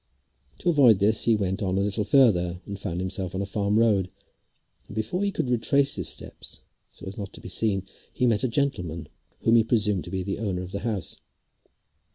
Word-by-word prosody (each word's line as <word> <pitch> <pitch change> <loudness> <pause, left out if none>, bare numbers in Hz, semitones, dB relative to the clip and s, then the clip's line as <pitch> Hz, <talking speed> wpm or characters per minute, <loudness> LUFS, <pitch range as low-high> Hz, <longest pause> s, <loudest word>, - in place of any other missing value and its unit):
To 175 - -1
avoid 130 - +6
this 105 +3 +3
he 115 - +4
went 95 -1 -2
on 95 -1 0
a - - +2
little 100 +1 -1
further 100 -7 +3
and 100 -1 -7
found 90 -3 -4
himself 95 0 -3
on 95 - -1
a - - -3
farm 100 +1 0
road, 105 -5 +3 0.8
and - - -10
before 110 - -2
he 200 - +1
could 135 - -2
retrace 140 +4 +2
his - - -1
steps - - -9 0.3
so - - -13
as 95 +2 -7
not 100 -1 -6
to - - -9
be - - -9
seen, 100 -4 +1 0.3
he 125 - 0
met 110 -4 +2
a - - +3
gentleman 90 - -2 0.3
whom 115 +1 +4
he 115 - +5
presumed 105 -5 +1
to - - -8
be 95 0 -3
the 100 +2 -4
owner 95 -5 -2
of 90 - -9
the 100 - -3
house. 105 -4 -4
105 Hz, 210 wpm, -26 LUFS, 95-115 Hz, 0.8 s, avoid